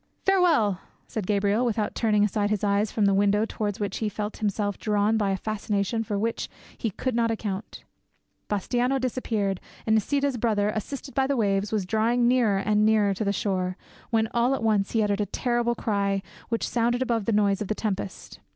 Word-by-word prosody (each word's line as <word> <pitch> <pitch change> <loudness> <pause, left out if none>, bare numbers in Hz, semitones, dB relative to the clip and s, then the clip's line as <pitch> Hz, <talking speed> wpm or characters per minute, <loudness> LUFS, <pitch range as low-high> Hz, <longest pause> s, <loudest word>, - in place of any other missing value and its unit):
"Farewell," 320 - +3 0.3
said 210 -5 -4
Gabriel, 205 +2 +2
without 220 -3 0
turning 210 -3 +2
aside 205 0 +1
his 210 -1 -1
eyes 205 +1 +1
from 215 - +1
the 200 - +4
window 205 +2 +3
towards 205 -3 -3
which 200 -2 -2
he 220 - -1
felt 210 +1 -4
himself 205 -1 -1
drawn 210 0 +1
by 210 -3 +1
a 195 - 0
fascination 215 +1 -1
for 205 -2 -2
which 225 +3 -2 0.3
he 230 - -2
could 255 +6 -3
not 230 0 +2
account. 210 -3 -4 0.7
Bastiano 245 +6 0
disappeared, 220 -7 -1 0.2
and 220 - +2
Nisida's 275 +5 +1
brother, 215 -3 +1
assisted 270 +5 -5
by 270 -1 +2
the 280 -1 0
waves, 200 -2 +1
was 210 -4 0
drawing 230 +4 +2
nearer 240 -5 +3
and 210 +1 +2
nearer 215 -2 +3
to 195 - -3
the 200 - +1
shore, 185 -2 -1 0.3
when, 225 -2 +2
at - - -9
all 245 +3 +2
once, 210 -3 +1
he 225 -2 +3
uttered 205 0 0
a 205 - -1
terrible 240 +3 0
cry 200 -3 0 0.3
which 230 -1 -1
sounded 240 +1 +1
above 230 -5 -1
the - - +1
noise 205 -2 +2
of 210 - -2
the 215 - -1
tempest. 200 -3 -4
215 Hz, 195 wpm, -26 LUFS, 200-230 Hz, 0.7 s, the